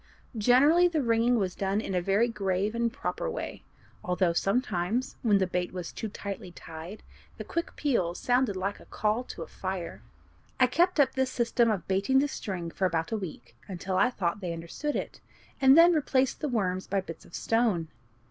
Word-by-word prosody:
Generally 275 +11 +5
the 320 -5 0
ringing 230 +1 +3
was 190 -4 -1
done 195 +1 -1
in 195 - -4
a 180 - +1
very 200 +6 +2
grave 200 -2 -1
and 235 0 0
proper 285 - -3
way, 470 - -5 0.4
although 180 -1 +1
sometimes, 205 +3 0
when 210 -4 +4
the 190 - +2
bait 180 0 -2
was 180 -2 -6
too 220 - -4
tightly 200 -2 -6
tied, 165 +4 -9 0.3
the - - -5
quick 335 - -4
peals 190 - 0
sounded 245 -4 +2
like 195 +2 -3
a - - -15
call 215 +3 0
to 165 - -7
a - - -11
fire. 185 -2 -5 0.6
I 255 - +7
kept 340 +7 +2
up 280 - +4
this 265 -1 0
system 235 -1 +2
of 195 -6 -2
baiting 195 +7 +2
the 280 +2 +4
string 180 -10 -5
for 190 - +1
about 165 -2 -2
a - - +1
week, 155 - -8
until 185 0 -4
I 245 - +4
thought 190 -6 -2
they 180 -4 -3
understood 170 - -4
it, - - -4 0.4
and 265 +2 +7
then 340 +1 +8
replaced 270 -4 +1
the 300 - -1
worms 185 -6 -1
by 195 0 0
bits 170 -3 -9
of - - -12
stone. 225 -8 +1
205 Hz, 195 wpm, -28 LUFS, 180-250 Hz, 0.6 s, then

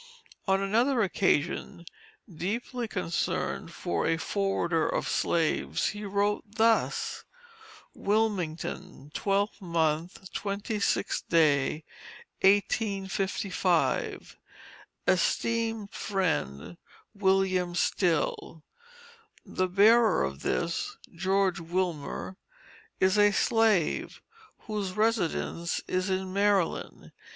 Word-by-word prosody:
On 195 0 +2
another 230 +5 +2
occasion 175 -2 0 0.4
deeply 225 +7 -4
concerned 180 -5 -2
for 85 -1 -2
A 165 - +2
FORWARDER 175 -3 0
OF - - -1
SLAVES, 165 -2 0
he 210 0 -6
wrote 205 +1 0
thus: 225 0 +1 0.7
WILMINGTON, 185 -8 -2
12th 200 +2 0
mo. 165 -2 0
26th, 200 +3 -2 1.1
1855. 195 -3 0 0.7
ESTEEMED 225 -3 0
FRIEND, 175 - -2 0.4
WM. 190 -3 +1
STILL: 165 -3 0 0.8
The 185 - -1
bearer 215 - +5
of 70 +1 -4
this, 295 - -2 0.2
George 190 +1 +1
Wilmer, 175 +1 -3 0.6
is 190 +2 +3
a 205 0 +6
slave, 215 -4 +1 0.4
whose 205 -4 -4
residence 185 -5 0
is 185 +1 -1
in 190 0 -2
Maryland. 200 -3 0
195 Hz, 80 wpm, -28 LUFS, 175-205 Hz, 1.1 s, a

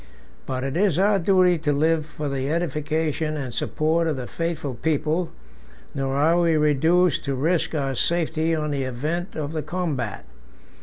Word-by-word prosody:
But 130 -1 -2
it 135 +1 -3
is 185 -3 +2
our 200 +1 +3
duty 180 -1 +4
to 150 -1 0
live 155 +2 +1
for 150 -1 -5
the 135 0 -2
edification 155 -1 -1
and 130 -4 -4
support 160 +6 0
of 155 - 0
the 130 - -4
faithful 160 -2 -3
people; 155 +6 0 0.6
nor 135 -1 -2
are 160 +5 +3
we 165 -2 +3
reduced 160 +4 +3
to 140 -1 -1
risk 165 +4 0
our 135 -3 -1
safety 165 +2 0
on 150 -1 -2
the 140 -1 -1
event 150 - -3
of 155 0 -4
a 155 - 0
combat. 150 - -3
155 Hz, 165 wpm, -24 LUFS, 140-170 Hz, 0.6 s, duty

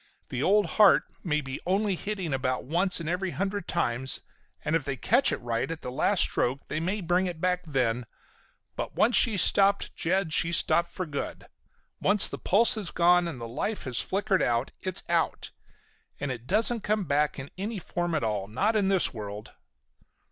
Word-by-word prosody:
The 125 - -3
old 205 +5 +3
heart 195 +3 +5 0.2
may 155 -3 0
be 135 -1 -6
only 195 +3 0
hitting 190 -5 -4
about 130 -1 -1
once 175 +7 +2
in 165 - -6
every 180 +3 -1
hundred 195 +1 -3
times, 130 -6 -1 0.4
and 150 - +1
if 165 - 0
they 135 -1 -4
catch - - +3
it - - -1
right 115 +2 -3
at 165 -1 -6
the 125 - -5
last 130 - +2
stroke 130 +3 0
they 155 - -2
may 190 +6 -2
bring 180 +2 +1
it 175 -3 -6
back 180 +1 0
then, 125 -4 -1 0.7
but - - -5
once 230 +3 +3
she's 215 -7 +6
stopped, 200 0 +3
Jed, 175 -1 -1
she's 170 +2 +3
stopped 170 0 +2
for 185 - -5
good. 145 -3 -6 0.6
Once 205 0 +5
the - - -5
pulse 230 +6 +3
has 210 -6 -1
gone, 175 0 +3
and 160 -6 -6
life 120 - -4
has 130 -4 0
flickered 195 -1 0
out, 120 +2 0
it's 185 0 0
out. 170 -1 -1 0.7
And 140 -1 -3
it 120 -1 -8
doesn't 225 +4 +2
come 210 0 0
back 150 -1 0
in 135 0 -8
any 205 +4 -4
form 175 -1 -3
at 155 - -1
all, 105 -3 -2
not 195 - 0
in 205 -3 +2
this 190 -6 +3
world!" 105 -1 -8
170 Hz, 190 wpm, -27 LUFS, 135-195 Hz, 0.7 s, she's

